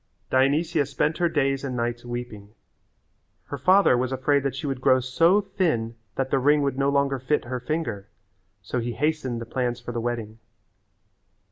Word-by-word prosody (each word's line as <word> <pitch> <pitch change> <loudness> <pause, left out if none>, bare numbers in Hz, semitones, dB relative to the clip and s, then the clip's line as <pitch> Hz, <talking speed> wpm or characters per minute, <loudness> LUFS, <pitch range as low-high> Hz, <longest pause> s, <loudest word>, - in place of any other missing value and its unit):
Dionysia 145 +3 +2
spent 155 +3 -1
her 175 -1 +2
days 135 -3 0
and 130 -2 -3
nights 120 0 -2
weeping. 120 -4 -7 0.9
Her - - -6
father 190 -6 +5
was 125 +1 -1
afraid 140 +2 +1
that 135 -1 -2
she 140 - -5
would 135 -3 -3
grow 130 -1 +4
so 165 +10 +3
thin 165 - -1 0.2
that 135 0 -2
the 135 - +3
ring 145 +2 +3
would 140 -1 0
no 135 +1 +1
longer 140 -1 +1
fit 130 +3 0
her 125 +1 -4
finger, 120 -8 -3 0.6
so 125 +6 -2
he 120 0 -3
hastened 145 -5 -1
the 115 - -6
plans 120 0 -2
for - - -7
the 120 -1 -3
wedding. 115 -2 -4
130 Hz, 175 wpm, -25 LUFS, 120-145 Hz, 0.9 s, father